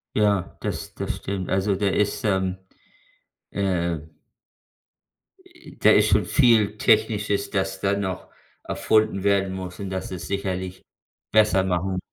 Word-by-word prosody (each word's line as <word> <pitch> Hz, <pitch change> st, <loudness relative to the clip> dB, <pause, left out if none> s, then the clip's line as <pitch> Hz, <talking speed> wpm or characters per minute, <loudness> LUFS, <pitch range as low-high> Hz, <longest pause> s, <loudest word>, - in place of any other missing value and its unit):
Ja, 100 Hz, -4 st, +1 dB
das -, -, -5 dB
das -, -, -3 dB
stimmt. 95 Hz, -2 st, -4 dB
Also 95 Hz, +1 st, +1 dB
da 100 Hz, +1 st, 0 dB
ist, 105 Hz, +1 st, 0 dB
ähm, 95 Hz, -2 st, 0 dB, 0.9 s
äh 85 Hz, -5 st, -1 dB, 1.4 s
äh, 355 Hz, -1 st, -16 dB
da -, -, +6 dB
ist -, -, +5 dB
schon -, -, +3 dB
viel 110 Hz, -6 st, +3 dB
Technisches, 105 Hz, -2 st, +2 dB
das 95 Hz, 0 st, -2 dB
da 100 Hz, +1 st, +1 dB
noch 95 Hz, -3 st, -4 dB, 0.4 s
erfunden 110 Hz, -3 st, +1 dB
werden 100 Hz, -1 st, +2 dB
muss 95 Hz, -1 st, -7 dB
und 100 Hz, -1 st, -5 dB
dass 95 Hz, 0 st, -4 dB
es 90 Hz, -1 st, -6 dB
sicherlich 95 Hz, -2 st, -3 dB, 0.5 s
besser 105 Hz, -3 st, +4 dB
machen. 95 Hz, 0 st, -1 dB
95 Hz, 135 wpm, -24 LUFS, 95-105 Hz, 1.4 s, da